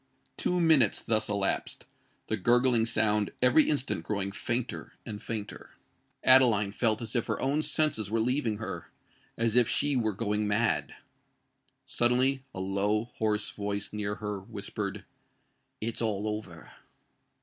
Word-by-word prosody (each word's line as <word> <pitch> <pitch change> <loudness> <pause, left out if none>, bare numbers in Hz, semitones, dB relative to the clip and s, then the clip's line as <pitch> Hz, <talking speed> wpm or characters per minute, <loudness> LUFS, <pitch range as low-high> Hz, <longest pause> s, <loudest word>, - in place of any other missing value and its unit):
Two 180 - 0
minutes 155 - +4
thus 110 -1 0
elapsed—the 105 +2 -4
gurgling 120 +2 +3
sound 105 -2 +1
every 125 +5 +5
instant 140 - 0
growing 100 0 -2
fainter 120 +4 -4
and 105 -2 -6
fainter. 110 -3 -6 0.5
Adeline 120 -6 +6
felt 110 +1 +1
as 115 +2 -6
if 120 - 0
her - - -2
own 140 +3 +1
senses 150 -10 +1
were 115 +2 0
leaving 120 -2 0
her—as 115 +1 -6
if 125 -2 +5
she 145 -1 +2
were 110 -4 0
going 105 0 -1
mad. 105 -2 0 0.9
Suddenly 130 +3 +2
a - - -7
low, 100 +4 -1
hoarse 105 -1 0
voice 100 0 -4
near 105 -1 -3
her 105 -1 -4
whispered, 100 +1 -6 0.7
"It's 115 +1 -3
all 105 -2 -1
over!" 105 -6 -6
110 Hz, 130 wpm, -29 LUFS, 105-125 Hz, 0.9 s, Adeline